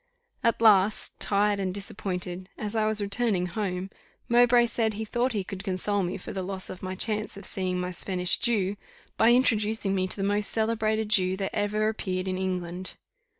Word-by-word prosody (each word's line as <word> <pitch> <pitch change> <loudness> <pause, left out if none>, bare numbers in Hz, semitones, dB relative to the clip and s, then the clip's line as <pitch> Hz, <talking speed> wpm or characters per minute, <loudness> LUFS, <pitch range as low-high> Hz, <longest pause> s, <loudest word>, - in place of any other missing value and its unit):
At 230 -1 +2
last, 210 -1 +4
tired 205 0 +1
and 190 -1 -1
disappointed, 185 -1 -5
as 210 +1 -4
I 215 -1 +2
was 215 -1 0
returning 200 -2 0
home, 185 0 -3 0.4
Mowbray 240 0 +5
said 225 -2 0
he 220 +1 -4
thought 240 +3 0
he 205 -3 -1
could 190 +1 -7
console 200 +1 0
me 180 +1 -2
for 180 - -8
the 190 - -3
loss 190 0 -4
of 185 - -9
my 185 0 -4
chance 215 +1 -2
of 200 - -9
seeing 185 -1 -1
my 180 0 -2
Spanish 180 0 +1
Jew, 205 -4 +1 0.4
by 225 +1 +5
introducing 220 -5 +2
me 185 -1 0
to 185 - +2
the 195 - -2
most 205 0 +1
celebrated 220 -1 0
Jew 185 -2 +3
that 195 -1 -3
ever 210 +1 0
appeared 190 -4 -2
in 185 0 -2
England. 185 -1 -2
200 Hz, 190 wpm, -27 LUFS, 185-220 Hz, 0.4 s, Mowbray